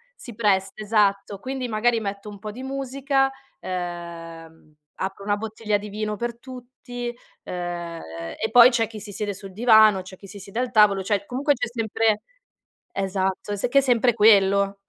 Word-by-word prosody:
si 240 - -11
presta, 195 -3 +1
esatto. 200 -2 +1
Quindi 260 0 -4
magari 230 +1 +1
metto 200 -1 -5
un 205 - -10
po' 210 +1 -7
di 245 - -9
musica, 270 0 0 0.3
ehm 165 -3 -7 0.2
apro 195 +1 -4
una 205 0 +1
bottiglia 215 -1 -2
di 205 +1 -8
vino 210 +1 -3
per 235 +2 -4
tutti 245 -1 -8 0.3
ehm 175 -2 -5 0.4
e 220 - -2
poi 245 +1 +9
c'è 230 -2 +1
chi 220 0 -9
si 210 0 -9
siede 205 0 -3
sul 195 -1 -10
divano, 220 -3 +6
c'è 185 0 -11
chi - - -15
si 200 - -10
siede 200 +4 -6
al 255 -1 -1
tavolo, 210 -4 +5
cioè 200 0 0
comunque 285 +4 +1
c'è - - -2
sempre 225 -2 0 0.7
esatto, 190 +1 -2
è 205 +4 -1
che 275 - +5
è - - +3
sempre 245 -2 +3
quello. 200 -2 +4
210 Hz, 175 wpm, -24 LUFS, 195-240 Hz, 0.7 s, poi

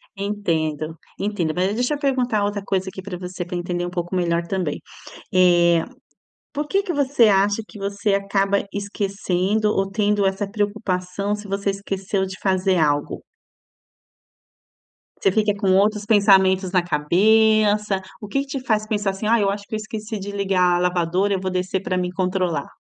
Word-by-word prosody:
Entendo. 165 -6 -2 0.2
Entendo. 190 -6 -1
Mas 185 +3 +1
deixa 245 +5 0
eu 290 - -3
perguntar 250 -7 +1
outra 205 0 -2
coisa 190 -1 -1
aqui 190 - -8
para 185 -2 -6
você, 180 -1 -6
para 180 - -6
entender 175 0 -2
um 175 - -4
pouco 175 0 -4
melhor 170 -1 0
também: 180 -5 -2 0.5
eh, 175 -2 +4 0.7
por 295 +1 -3
que 395 +3 +1
que 355 -4 -3
você 275 -5 +3
acha 200 +2 +2
que 215 - -12
você 200 +1 -1
acaba 200 0 0
esquecendo 200 0 -1
ou 195 -1 0
tendo 205 0 +1
essa 195 +1 -1
preocupação 200 -1 -2
se 205 0 -10
você 200 0 -1
esqueceu 195 0 -2
de 190 0 -7
fazer 190 -1 +1
algo? 145 -2 0 2.0
Você 195 - +3
fica 210 0 +2
com 195 -2 +1
outros 210 +1 +2
pensamentos 190 -3 +4
na 180 -2 +3
cabeça. 210 +5 +3 0.2
O 210 - -7
que 275 +6 0
que 280 - -7
te 255 - -15
faz 215 -2 +1
pensar, 205 -3 0
assim? 195 +3 -4
"Ah, 230 0 +4
eu 200 -1 +2
acho 200 0 -4
que - - -4
eu - - 0
esqueci 215 0 -5
de 200 +1 -6
ligar 190 -3 +2
a - - -1
lavadora, 180 +2 +1
eu 190 - -1
vou 185 -1 -2
descer 185 +1 -1
pra 185 - -1
mim 180 0 -1
controlar". 185 -5 -1
195 Hz, 175 wpm, -22 LUFS, 180-210 Hz, 2.0 s, eh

